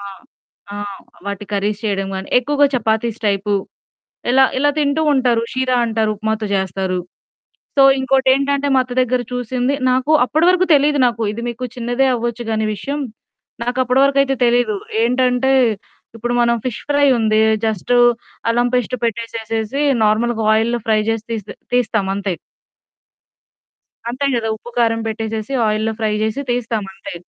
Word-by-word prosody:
ఆ! - - -10 0.7
ఆ! - - -5 0.5
వాటి 200 0 -4
కర్రీస్ 205 +2 -1
చేయడం 195 -2 -1
గాని, 190 0 -5
ఎక్కువగా 290 +3 +2
చపాతీస్ 220 0 -1
టైపు 200 +1 -1 0.8
ఇలా 265 +2 +5
ఇలా 290 +2 +3
తింటూ 285 +1 +1
ఉంటారు. 245 -4 +2
షీరా 255 -1 0
అంటారు 220 -1 0
ఉప్మాతో 220 +1 -2
చేస్తారు. 190 -1 -1 0.8
సో 275 - +6 0.2
ఇంకోటేంటంటే, 270 +2 +2
మా 260 - +5
అత్త 250 - -9
దగ్గర 255 0 +1
చూసింది. 250 +2 -1 0.2
నాకు 255 +4 +1
అప్పటి 315 +6 +1
వరకు 365 0 +2
తెలీదు 290 +1 +3
నాకు, 230 -2 -2
ఇది 230 +2 -6
మీకు 240 +1 -5
చిన్నదే 245 +2 0
అవ్వచ్చు 235 0 -3
కానీ 220 0 0
విషయం 280 +8 -4 0.6
నాకప్పటి 250 +1 +1
వరకైతే 275 -1 +2
తెలీదు. 235 -3 +2 0.3
ఏంటంటే, 250 +2 +2 0.6
ఇప్పుడు 240 +2 -2
మనం 235 0 +2
ఫిష్ 240 -2 -4
ఫ్రై 285 0 +4
ఉంది 215 -1 +2 0.3
జస్ట్ 220 +2 -2 0.6
అల్లం 240 +1 +2
పేస్ట్ 250 0 0
పెట్టేసేసి, 230 +2 -3 0.2
నార్మల్‌గా 220 +1 +1
ఆయిల్‌‌లో 230 +2 +1
ఫ్రై 215 -1 +3
చేసి 225 -1 -2
తీ 230 - 0 0.4
తీస్తామంతే. 200 -5 0 1.8
అంతే 265 +4 -2
కదా! 225 -1 -1
ఉప్పు 240 - -12
కారం 225 -1 +2
పెట్టేసేసి, 220 +2 -4 0.2
ఆయిల్‌లో 215 +1 0
ఫ్రై 215 -1 0
చేసి 220 +5 -2
తీస్తామంతే. 220 -7 -4
235 Hz, 135 wpm, -18 LUFS, 220-255 Hz, 1.8 s, సో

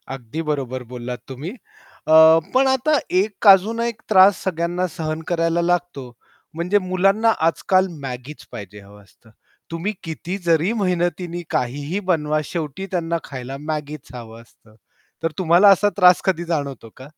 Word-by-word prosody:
अगदी 130 +5 -6
बरोबर 130 -3 -3
बोललात 125 0 -6
तुम्ही. 135 +7 -6
अ, 200 -8 -7 0.4
पण 265 +1 +4
आता 265 +4 +2 0.2
एक 210 +1 -3
अजून 200 +4 +6
एक 235 -2 -3
त्रास 195 -1 +5
सगळ्यांना 175 0 -1
सहन 155 -1 -3
करायला 165 0 0
लागतो, 170 -7 -2 0.4
म्हणजे 175 +5 0
मुलांना 195 +4 +2 0.2
आजकाल 185 +3 +2 0.2
Maggieच 130 +3 -8
पाहिजे 105 -1 -9
हवं 100 +1 -16
असतं. 110 +2 -24 0.4
तुम्ही 170 +6 -3
किती 170 +3 -5
जरी 165 +3 +2
मेहनतीने 175 -1 -1
काहीही 145 +9 -2
बनवा 155 -2 0
शेवटी 160 +3 -5
त्यांना 170 -2 -1
खायला 130 -1 -7 0.2
Maggieच 150 -2 -6
हवं 115 -1 -10
असतं, 110 -1 -24 0.5
तर 165 - 0
तुम्हाला 180 +3 +5
असा 200 +1 +4
त्रास 180 -2 +6
कधी 180 -3 0
जाणवतो 140 -8 -4
का? 130 0 -11
165 Hz, 145 wpm, -21 LUFS, 140-185 Hz, 0.5 s, अजून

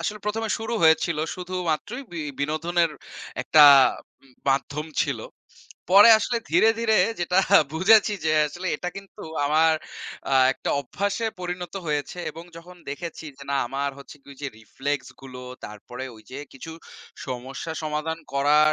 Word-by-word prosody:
আসলে 210 - -3
প্রথমে 220 +1 -2
শুরু 225 +1 -5
হয়েছিল 160 0 +4 0.2
শুধুমাত্রই 180 - -3
বি 170 - -4 0.2
বিনোদনের 165 +3 0 0.5
একটা 155 -1 +6 0.6
উম 135 - -22 0.2
মাধ্যম 145 +3 0 0.2
ছিল। - - -2 0.7
পরে 205 +4 +9
আসলে 235 +2 -1
ধীরে, 225 - +5
ধীরে 220 -2 +2 0.2
যেটা 180 +2 +1 0.3
বুঝেছি 210 +6 +5
যে 155 - +2 0.2
আসলে 180 +4 -7
এটা 180 - -4
কিন্তু 195 0 -11 0.2
আমার 160 +2 +4 0.6
আ - - +4 0.2
একটা - - -4
অভ্যাসে 200 - -2
পরিণত 180 +1 -5
হয়েছে 150 +3 -2
এবং 165 +1 -11
যখন 180 +2 -12
দেখেছি 165 +2 -7
যে - - -11
না 140 - +1
আমার 140 +2 -2
হচ্ছে 140 +2 -12
কি 140 - -14
যে - - -2
রিফ্লেক্স 135 +3 -4
গুলো, 130 -1 -9 0.2
তারপরে 105 +5 -8
ওইযে 130 +5 -11
কিছু 160 +5 -9 0.6
সমস্যা 130 +5 -5
সমাধান 155 +1 -3 0.2
করার 150 +2 +4
160 Hz, 140 wpm, -24 LUFS, 140-185 Hz, 0.7 s, পরে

